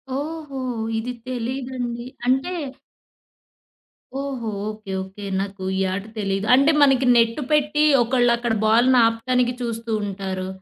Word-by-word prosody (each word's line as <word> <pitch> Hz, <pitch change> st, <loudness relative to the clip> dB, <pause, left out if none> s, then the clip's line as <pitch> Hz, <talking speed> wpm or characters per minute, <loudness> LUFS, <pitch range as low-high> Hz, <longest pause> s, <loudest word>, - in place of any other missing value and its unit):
ఓహో! 295 Hz, -2 st, -5 dB, 0.4 s
ఇది 240 Hz, +3 st, -3 dB, 0.2 s
తెలీదండి. 245 Hz, -1 st, -4 dB, 0.2 s
అంటే 265 Hz, +7 st, +1 dB, 1.7 s
ఓహో! 260 Hz, -5 st, -4 dB, 0.2 s
ఓకే. 215 Hz, -2 st, -8 dB
ఓకే. 195 Hz, +2 st, -10 dB, 0.2 s
నాకు 195 Hz, -1 st, -6 dB
ఈ -, -, 0 dB
ఆట 195 Hz, +1 st, -3 dB, 0.2 s
తెలీదు. 195 Hz, 0 st, -1 dB
అంటే, 280 Hz, +4 st, +4 dB
మనకి 270 Hz, -2 st, +4 dB
నెట్టు 230 Hz, +4 st, +3 dB
పెట్టి, 300 Hz, 0 st, +2 dB, 0.2 s
ఒకళ్ళు 245 Hz, 0 st, +2 dB
అక్కడ 240 Hz, -1 st, -1 dB
బాలుని 240 Hz, +3 st, +5 dB
ఆపటానికి 245 Hz, +2 st, 0 dB
చూస్తూ 230 Hz, -1 st, -4 dB
ఉంటారు! 190 Hz, -1 st, -4 dB
240 Hz, 120 wpm, -22 LUFS, 215-265 Hz, 1.7 s, బాలుని